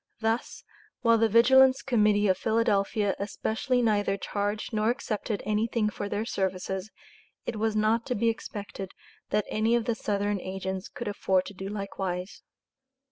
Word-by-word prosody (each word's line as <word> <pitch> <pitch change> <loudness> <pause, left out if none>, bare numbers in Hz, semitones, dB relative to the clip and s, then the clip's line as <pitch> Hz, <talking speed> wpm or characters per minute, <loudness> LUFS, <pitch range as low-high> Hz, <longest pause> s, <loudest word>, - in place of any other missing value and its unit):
Thus, 225 +2 -1 0.4
while 230 -1 +4
the 225 0 +3
Vigilance 260 +4 +6
Committee 210 -4 +3
of 185 - +4
Philadelphia 210 -1 +1
especially 225 +5 -1
neither 205 -3 +2
charged 205 +3 -3
nor 215 +1 +2
accepted 225 -4 -2
anything 215 +1 +1
for 205 0 -5
their 210 +2 -2
services, 190 -1 -2 0.6
it 225 - -3
was 220 0 0
not 220 +3 +2
to 250 - 0
be 230 +3 +1
expected 205 -4 -4 0.4
that 210 0 +1
any 220 +2 +2
of 235 -2 0
the 235 - +1
Southern 205 -2 -1
agents 190 0 -4
could 240 - -7
afford 190 -2 +1
to - - -8
do 190 0 -6
likewise. 195 -2 -4
210 Hz, 150 wpm, -28 LUFS, 200-230 Hz, 0.6 s, Vigilance